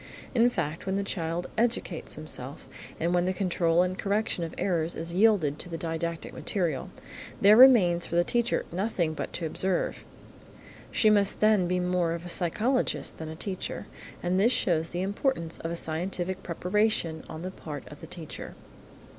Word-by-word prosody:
In 240 Hz, -1 st, +5 dB
fact, 165 Hz, -5 st, -3 dB
when 190 Hz, -, 0 dB
the 200 Hz, -, 0 dB
child 170 Hz, -2 st, -3 dB
educates 240 Hz, +1 st, -1 dB
himself, -, -, -6 dB, 0.3 s
and 170 Hz, +2 st, +1 dB
when 175 Hz, 0 st, +2 dB
the 185 Hz, -, +1 dB
control 175 Hz, -2 st, +2 dB
and 185 Hz, 0 st, -2 dB
correction 200 Hz, -2 st, -1 dB
of 165 Hz, -, -5 dB
errors 170 Hz, -3 st, 0 dB
is 165 Hz, +1 st, -4 dB
yielded 180 Hz, -8 st, +3 dB
to 180 Hz, -, -6 dB
the 165 Hz, -, -4 dB
didactic 165 Hz, 0 st, -3 dB
material, 170 Hz, -9 st, -2 dB, 0.5 s
there 205 Hz, +2 st, +7 dB
remains 210 Hz, -9 st, +7 dB
for -, -, -4 dB
the 175 Hz, -, +5 dB
teacher 235 Hz, +5 st, +1 dB
nothing 175 Hz, -3 st, -1 dB
but -, -, -5 dB
to 170 Hz, -, -3 dB
observe. 185 Hz, +3 st, -1 dB, 0.9 s
She 215 Hz, -, +4 dB
must 205 Hz, -2 st, +3 dB
then 215 Hz, -4 st, +4 dB
be 180 Hz, +1 st, +1 dB
more 180 Hz, -2 st, +1 dB
of 170 Hz, +1 st, -6 dB
a -, -, -6 dB
psychologist 215 Hz, +10 st, 0 dB
than 160 Hz, -1 st, -5 dB
a 160 Hz, -, -6 dB
teacher, 185 Hz, +2 st, -4 dB, 0.4 s
and 180 Hz, +2 st, +1 dB
this 225 Hz, +5 st, +4 dB
shows 165 Hz, -8 st, +1 dB
the 175 Hz, +2 st, -3 dB
importance 195 Hz, -, -1 dB
of 165 Hz, -, -4 dB
a 170 Hz, -, -3 dB
scientific 175 Hz, +3 st, -2 dB
preparation 180 Hz, -2 st, 0 dB
on 160 Hz, +2 st, -7 dB
the 185 Hz, -, -4 dB
part 150 Hz, -6 st, -8 dB
of 150 Hz, -, -12 dB
the 160 Hz, -, -9 dB
teacher. 160 Hz, -2 st, -8 dB
180 Hz, 175 wpm, -28 LUFS, 165-200 Hz, 0.9 s, there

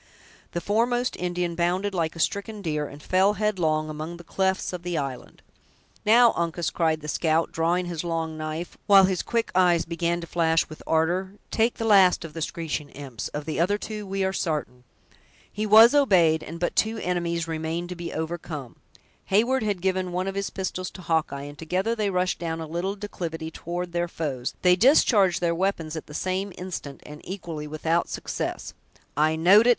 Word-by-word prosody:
The 170 Hz, -, -2 dB
foremost 240 Hz, +6 st, +1 dB
Indian 175 Hz, -1 st, -2 dB
bounded 180 Hz, +4 st, 0 dB
like 165 Hz, -3 st, -1 dB
a -, -, -9 dB
stricken 200 Hz, +4 st, -2 dB
deer, 150 Hz, -3 st, -1 dB
and 145 Hz, +1 st, -12 dB
fell 190 Hz, +2 st, +3 dB
headlong 175 Hz, -7 st, 0 dB
among 155 Hz, +3 st, -6 dB
the 175 Hz, -, -12 dB
clefts 190 Hz, +2 st, -1 dB
of 180 Hz, -, -4 dB
the 175 Hz, -1 st, -3 dB
island. 135 Hz, -4 st, -5 dB, 0.6 s
"Now, 235 Hz, +2 st, +7 dB
Uncas!" 170 Hz, 0 st, -1 dB
cried 160 Hz, -2 st, +1 dB
the 150 Hz, -, -8 dB
scout, 160 Hz, +1 st, +1 dB
drawing 170 Hz, +2 st, +1 dB
his 175 Hz, -2 st, -4 dB
long 165 Hz, -2 st, -2 dB
knife, 155 Hz, +2 st, -5 dB
while 195 Hz, -1 st, +8 dB
his 185 Hz, -1 st, +2 dB
quick 230 Hz, -1 st, -1 dB
eyes 175 Hz, -2 st, +4 dB
began 170 Hz, 0 st, -1 dB
to 170 Hz, -, -6 dB
flash 165 Hz, -1 st, +2 dB
with 155 Hz, -, -11 dB
ardor, 175 Hz, +4 st, +1 dB, 0.2 s
"take 230 Hz, +2 st, +2 dB
the 225 Hz, -, -3 dB
last 195 Hz, -5 st, +5 dB
of 155 Hz, -, -9 dB
the 165 Hz, -, -6 dB
screeching 155 Hz, -2 st, -3 dB
imps; 135 Hz, -5 st, -7 dB
of 150 Hz, 0 st, -6 dB
the 160 Hz, -, -3 dB
other 190 Hz, +5 st, +2 dB
two 210 Hz, -1 st, -6 dB
we 195 Hz, 0 st, -1 dB
are 190 Hz, 0 st, 0 dB
sartain!" 150 Hz, -9 st, -3 dB, 0.7 s
He 215 Hz, +1 st, -2 dB
was 220 Hz, +4 st, +8 dB
obeyed; 180 Hz, -, +4 dB
and 165 Hz, +2 st, -8 dB
but 175 Hz, -, -1 dB
two 220 Hz, +1 st, +1 dB
enemies 170 Hz, -3 st, -1 dB
remained 165 Hz, +2 st, -3 dB
to 180 Hz, -, -5 dB
be 170 Hz, -1 st, -6 dB
overcome. 160 Hz, -5 st, -5 dB, 0.5 s
Heyward 235 Hz, +6 st, +2 dB
had 205 Hz, -4 st, -1 dB
given 185 Hz, -1 st, 0 dB
one 180 Hz, +1 st, -1 dB
of 195 Hz, -, -2 dB
his 200 Hz, 0 st, -2 dB
pistols 185 Hz, -1 st, -4 dB
to 185 Hz, -, -10 dB
Hawkeye, 160 Hz, -4 st, 0 dB
and 145 Hz, 0 st, -9 dB
together 185 Hz, +7 st, 0 dB
they 210 Hz, -3 st, 0 dB
rushed 180 Hz, -1 st, 0 dB
down 165 Hz, -1 st, -3 dB
a 160 Hz, -, -4 dB
little 175 Hz, +5 st, -3 dB
declivity 165 Hz, -6 st, -5 dB
toward 175 Hz, +2 st, -5 dB
their 175 Hz, 0 st, 0 dB
foes; 140 Hz, -7 st, -4 dB
they 180 Hz, -1 st, +6 dB
discharged 205 Hz, -, +4 dB
their 170 Hz, -1 st, +2 dB
weapons 165 Hz, -3 st, -1 dB
at 160 Hz, -, -6 dB
the 150 Hz, -, -10 dB
same 190 Hz, +3 st, -2 dB
instant, 175 Hz, -6 st, -6 dB
and 150 Hz, 0 st, -10 dB
equally 170 Hz, -5 st, -6 dB
without 160 Hz, +3 st, 0 dB
success. -, -, -4 dB, 0.4 s
"I 155 Hz, +2 st, +3 dB
know'd 195 Hz, +8 st, +6 dB
it! -, -, +6 dB
175 Hz, 190 wpm, -25 LUFS, 160-190 Hz, 0.7 s, while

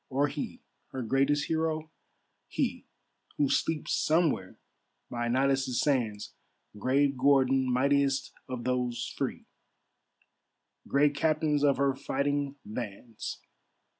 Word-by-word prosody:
Or 140 Hz, +2 st, +1 dB
he, 145 Hz, +1 st, -6 dB, 0.3 s
her 130 Hz, -, -3 dB
greatest 140 Hz, +5 st, +2 dB
hero, 160 Hz, -1 st, -1 dB, 0.6 s
he, -, -, -2 dB, 0.5 s
Who 145 Hz, -2 st, +2 dB
sleeps 160 Hz, -2 st, 0 dB
somewhere 155 Hz, -, +1 dB, 0.5 s
by 120 Hz, -1 st, -2 dB
Nilus' 130 Hz, 0 st, +1 dB
sands, 115 Hz, -8 st, 0 dB, 0.4 s
Grave 135 Hz, +6 st, +2 dB
Gordon, 130 Hz, -1 st, +3 dB
mightiest 140 Hz, +1 st, +2 dB, 0.2 s
of 125 Hz, -2 st, -4 dB
those 125 Hz, -1 st, -1 dB
free, -, -, -3 dB, 1.4 s
Great 145 Hz, +1 st, +3 dB
captains 150 Hz, 0 st, +1 dB
of 140 Hz, -2 st, +4 dB
her 140 Hz, 0 st, +2 dB
fighting 140 Hz, +1 st, -1 dB
bands. 110 Hz, 0 st, -6 dB
135 Hz, 105 wpm, -29 LUFS, 125-145 Hz, 1.4 s, of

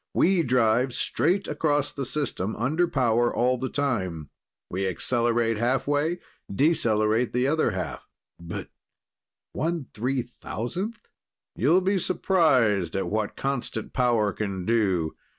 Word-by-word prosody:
"We 185 Hz, 0 st, +4 dB
drive 125 Hz, -2 st, +2 dB
straight 175 Hz, -, +1 dB
across 145 Hz, -1 st, 0 dB
the 135 Hz, -3 st, -4 dB
system, 125 Hz, -8 st, -2 dB
under 155 Hz, +9 st, +1 dB
power 120 Hz, -6 st, +2 dB
all 125 Hz, +1 st, +1 dB
the 130 Hz, +1 st, -2 dB
time. 95 Hz, -, -2 dB, 0.4 s
We 95 Hz, +2 st, -2 dB
accelerate 115 Hz, +2 st, 0 dB
half 125 Hz, +3 st, +1 dB
way, 145 Hz, +4 st, +1 dB, 0.3 s
decelerate 110 Hz, -, +2 dB
the 125 Hz, +1 st, +1 dB
other 155 Hz, +3 st, +2 dB
half." -, -, -5 dB, 0.3 s
"But 85 Hz, -1 st, -7 dB, 0.9 s
1/3,000th!" 135 Hz, -, -3 dB, 0.6 s
"You'll 160 Hz, -, +3 dB
be 190 Hz, +1 st, +1 dB
surprised 130 Hz, -, +2 dB
at 95 Hz, -, -2 dB
what 110 Hz, 0 st, -1 dB
constant 135 Hz, -5 st, -3 dB
power 115 Hz, -5 st, +2 dB
can 95 Hz, -4 st, -4 dB
do. 95 Hz, -8 st, +1 dB
125 Hz, 115 wpm, -26 LUFS, 110-145 Hz, 0.9 s, We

